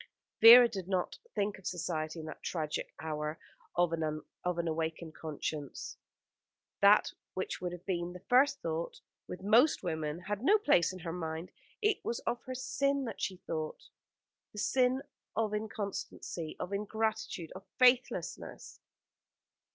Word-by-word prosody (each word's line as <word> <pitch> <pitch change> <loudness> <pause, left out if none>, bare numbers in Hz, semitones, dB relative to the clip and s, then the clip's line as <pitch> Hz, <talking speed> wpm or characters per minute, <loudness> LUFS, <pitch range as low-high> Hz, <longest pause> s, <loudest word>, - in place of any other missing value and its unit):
Vera 240 +2 +11
did 195 -6 -6
not 185 -2 -1 0.2
think 205 0 -1
of 190 - -7
Society 160 -2 -3
in 155 - -6
that 155 - -8
tragic 155 -3 -3
hour 155 0 -3 0.4
of 175 -1 +3
an 155 -2 -2 0.4
awakened 160 0 -2
conscience. 150 -2 -5 0.9
That 200 +1 +6 0.2
which 185 - -3
would 180 -1 -2
have 175 +1 -9
been 175 -2 -2
the 180 0 -11
first 275 +3 +4
thought 165 +1 -3 0.3
with 180 +1 -7
most 235 +9 +5
women 160 -1 -2
had 205 +3 -3
no 405 +9 +6
place 285 - +3
in 185 - -8
her 170 -2 -5
mind. 165 0 -4 0.3
It 420 -1 +2
was 235 - -2
of 240 - -2
her 255 - -5
sin 275 +2 0
that 230 - -6
she 185 - -2
thought 155 -1 -4 0.6
the - - -12
sin 255 +4 +2 0.3
of 220 -2 0
inconstancy, 205 -6 -4
of 180 +2 -4
ingratitude, 210 -4 -2
of 190 - -10
faithlessness. 250 0 +1
185 Hz, 145 wpm, -32 LUFS, 160-225 Hz, 0.9 s, Vera